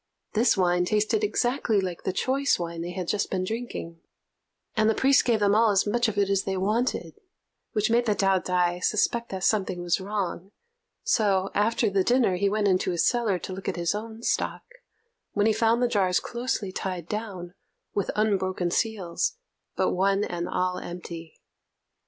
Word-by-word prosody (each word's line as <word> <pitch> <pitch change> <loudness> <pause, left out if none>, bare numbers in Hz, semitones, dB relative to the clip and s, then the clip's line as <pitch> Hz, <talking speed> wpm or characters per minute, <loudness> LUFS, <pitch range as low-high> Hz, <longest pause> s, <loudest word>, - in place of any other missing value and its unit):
This 230 0 +3
wine 180 -1 +3
tasted 215 - +1
exactly 245 - +1
like 180 -3 -4
the - - +1
choice 270 +8 +1
wine 170 -1 -4
they 170 - -4
had 180 -2 -4
just 205 +2 0
been 185 -1 -1
drinking, 185 -6 -5 0.7
and 220 -1 +3
the 220 - +2
priest 270 +1 +4
gave 230 -3 +2
them 200 0 +4
all 225 +1 +5
as 195 -2 +3
much 240 +3 +1
of 215 -2 -3
it 200 -1 +3
as 195 -1 +2
they 195 -1 -3
wanted, 225 - -1 0.5
which 215 +1 +1
made 240 +1 +3
the 210 - +2
Taot'ai 180 -2 +1
suspect 235 +2 +1
that 190 -1 -5
something 190 -4 +1
was 175 +2 +1
wrong; 195 -1 -4 0.5
so, 200 - +2
after 220 +2 +2
the 195 -2 +2
dinner, 240 -4 +3
he 200 +2 +1
went 210 0 +1
into 185 -1 +2
his 175 -2 +1
cellar 235 -6 +1
to 185 - -6
look 190 +1 -4
at - - -3
his 170 +1 0
own 220 +2 -6
stock, - - -1 0.7
when 205 0 +2
he 220 - +4
found 230 +2 +2
the - - +4
jars 195 -6 +2
closely 235 -5 -3
tied 185 -3 -4
down, 195 -5 -5 0.4
with 200 - -1
unbroken 190 -4 0
seals, 210 - -1 0.4
but - - +1
one 195 +2 +2
and 175 -2 -3
all 180 0 -1
empty. 170 -2 -8
200 Hz, 180 wpm, -26 LUFS, 185-225 Hz, 0.7 s, all